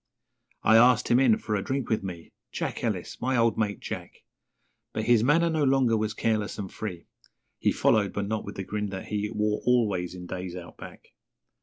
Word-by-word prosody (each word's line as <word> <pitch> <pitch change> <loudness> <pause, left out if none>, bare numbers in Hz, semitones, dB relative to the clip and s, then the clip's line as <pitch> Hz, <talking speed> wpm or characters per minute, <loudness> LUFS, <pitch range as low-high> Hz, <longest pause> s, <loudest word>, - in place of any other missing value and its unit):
I 110 +1 +6
asked 120 +1 +5
him 120 - +5
in 125 -5 +5
for 110 0 -4
a 100 - +1
drink 135 +2 -2
with 110 - 0
me 90 -4 -8 0.2
Jack - - -4
Ellis - - -3
my 130 +1 +1
old 115 -1 +3
mate, 105 -3 -1
Jack - - -7 0.7
But 110 - -2
his 115 -1 +4
manner 165 +6 +4
no 160 -2 +1
longer 130 -4 +3
was 110 0 -1
careless 110 -2 -1
and 100 -2 -6
free, 90 -6 -6 0.5
He - - +2
followed, 100 -3 +2
but 100 - -2
not 110 +1 -2
with - - -8
the 95 - -4
grin 105 +2 -3
that 95 -1 -7
he 105 0 -1
Wore 105 -1 -1
always 105 -8 +1
in 90 -1 -8
days 90 0 -5
Out 90 -1 -9
Back. - - -11
110 Hz, 200 wpm, -27 LUFS, 100-120 Hz, 0.7 s, I